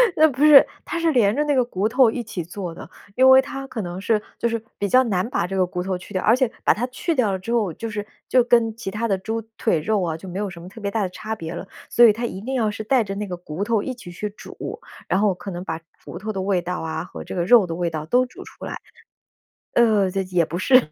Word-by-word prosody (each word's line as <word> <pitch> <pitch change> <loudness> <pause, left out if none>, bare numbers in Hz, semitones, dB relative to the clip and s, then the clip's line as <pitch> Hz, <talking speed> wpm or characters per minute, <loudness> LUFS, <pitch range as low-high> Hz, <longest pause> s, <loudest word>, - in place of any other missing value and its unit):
那 315 0 +6
不 275 +2 -1
是， 295 -3 +9 0.2
它 340 - -3
是 330 -1 +2
连 225 -5 +3
着 295 - +2
那 295 -1 +1
个 255 -2 +3
骨 205 -2 -1
头 250 -1 +5
一 240 +1 -3
起 190 -5 -5
做 175 0 -6
的。 - - -10 0.3
因 260 +1 +5
为 260 0 +9
它 275 -1 -7
可 225 -5 -5
能 175 0 -5
是 210 +1 +1 0.2
就 235 - +1
是 230 -1 -2 0.2
比 200 - -1
较 255 +4 +5
难 200 -3 0
把 170 - 0
这 195 - -4
个 185 - +3
骨 180 0 -4
头 185 0 -2
去 180 +3 -12
掉， 185 - -1
而 225 - +5
且 255 -3 +1
把 - - +5
它 240 +4 -2
去 290 +6 -2
掉 225 -6 +2
了 190 - -2
之 230 +6 -4
后， 205 -8 +1
就 230 - -5
是 210 -1 -4 0.2
就 250 -2 +5
跟 235 -2 +3
其 225 -4 -5
它 215 +4 -2
的 195 -2 +1
猪 220 +4 -3 0.2
腿 195 -8 +1
肉 210 +2 +1
啊 160 -2 -1
就 190 - -11
没 185 - -4
有 205 -1 -2
什 175 -1 -10
么 175 - -10
特 210 +4 -12
别 200 - -2
大 220 +1 -1
的 185 - -2
差 220 +4 -5
别 165 -3 -6
了。 190 - -7 0.2
所 240 - +6
以 215 - +7
它 235 +2 -3
一 190 - -5
定 260 +5 -3
要 225 -4 +1
是 220 - -6
带 245 +2 +3
着 195 -1 -5
那 205 0 -4
个 180 - -4
骨 175 +2 -5
头 220 -1 +1
一 260 - -3
起 210 -8 -11
去 210 +4 -4
煮， 215 - -12 0.5
然 190 - +1
后 205 -2 +3
可 195 +2 -8
能 175 0 -5
把 160 -2 -3 0.3
骨 175 - -7
头 215 +3 -4
的 195 - -3
味 185 -2 +1
道 180 +1 -4
啊， 160 0 -3
和 - - -9
这 - - -7
个 175 - 0
肉 230 -2 +6
的 165 - -4
味 175 0 -1
道 155 -1 -5
都 250 +8 +3
煮 250 - -11
出 - - -11
来 - - -5 1.0
呃， 215 -5 +4
也 195 0 -1
也 180 -3 +1
不 165 - -4
是， 255 - +4
210 Hz, 315 characters per minute, -22 LUFS, 185-240 Hz, 1.0 s, 是